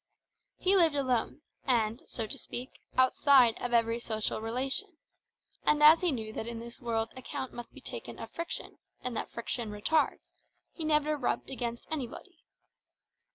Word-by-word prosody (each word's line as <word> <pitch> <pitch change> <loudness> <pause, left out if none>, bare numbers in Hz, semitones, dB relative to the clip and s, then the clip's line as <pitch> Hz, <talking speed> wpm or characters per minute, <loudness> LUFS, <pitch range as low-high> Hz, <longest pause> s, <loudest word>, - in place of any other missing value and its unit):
He 380 +2 +3
lived 330 -5 +5
alone, 260 +2 0 0.2
and, 230 -3 +1
so 225 - -3
to - - -3
speak, 250 +2 -7 0.2
outside 260 -2 +6
of 245 - -2
every 230 0 +3
social 220 -2 -2
relation; 270 - -2 0.7
and 300 0 +3
as 310 +2 +9
he 355 -2 +3
knew 220 -4 -4
that 220 - -4
in 235 -1 -4
this 235 +2 -9
world 225 -2 -1
account 260 0 -5
must 240 - -8
be - - -13
taken - - -7
of - - -8
friction, 335 0 -5 0.2
and 250 -2 -2
that - - -3
friction 235 -1 -3
retards, 210 - 0 0.4
he 325 - -6
never 305 -1 +2
rubbed 270 0 -1
against 240 -2 -4
anybody. 275 -7 -5
250 Hz, 155 wpm, -31 LUFS, 230-300 Hz, 0.7 s, as